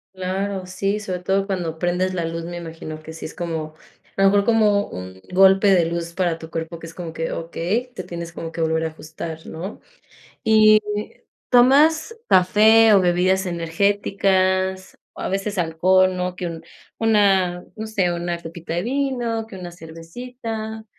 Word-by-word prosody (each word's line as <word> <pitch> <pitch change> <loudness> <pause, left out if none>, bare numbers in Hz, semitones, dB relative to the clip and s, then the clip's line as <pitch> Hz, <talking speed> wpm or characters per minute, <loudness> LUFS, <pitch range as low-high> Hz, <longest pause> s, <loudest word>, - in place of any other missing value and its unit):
Claro, 190 +1 -3
sí, 195 +3 -2
sobre 185 -3 -4
todo 195 +2 0
cuando 175 -5 -3
prendes 180 +2 0
la 175 -2 -2
luz, 165 0 -4
me 175 +1 -6
imagino 160 -2 -8
que 160 - -9
sí 160 - -8
es 155 - -7
como, 160 -3 -4 0.4
a 195 - -1
lo 195 - +7
mejor 200 0 +3
como 210 -3 +3
un 95 +1 -9
golpe 195 +2 +6
de 175 -3 +4
luz 170 0 -4
para 175 -2 -1
tu 160 0 -10
cuerpo 165 0 -5
que 165 - -9
es 165 - -11
como 170 -2 -6
que: 165 0 -3
"Okey, 180 +9 -2
te - - -7
tienes 170 -1 -6
como 165 -1 -7
que 165 - -4
volver 160 0 +1
a - - +1
ajustar", 160 +1 -8
¿no?, 180 +6 -7 0.6
¿y 215 -1 +6 0.7
tomas 295 - +5
café 215 +4 +6
o 195 - +6
bebidas 185 +2 +2
energéticas 190 +1 0 0.2
o - - -9
a - - -2
veces 195 +1 -2
alcohol?, 185 +3 +3
¿no?, 180 0 -3
que 180 - -4
un 165 -1 -6 0.4
una, 195 -5 +2
no 220 0 -6
sé, 190 -5 +1
una 175 0 -3
copita 165 0 -7
de 175 - -1
vino, 245 -3 -1
que 190 - -9
una 175 -1 -8
cervecita 220 +7 -7
185 Hz, 175 wpm, -22 LUFS, 165-205 Hz, 0.7 s, lo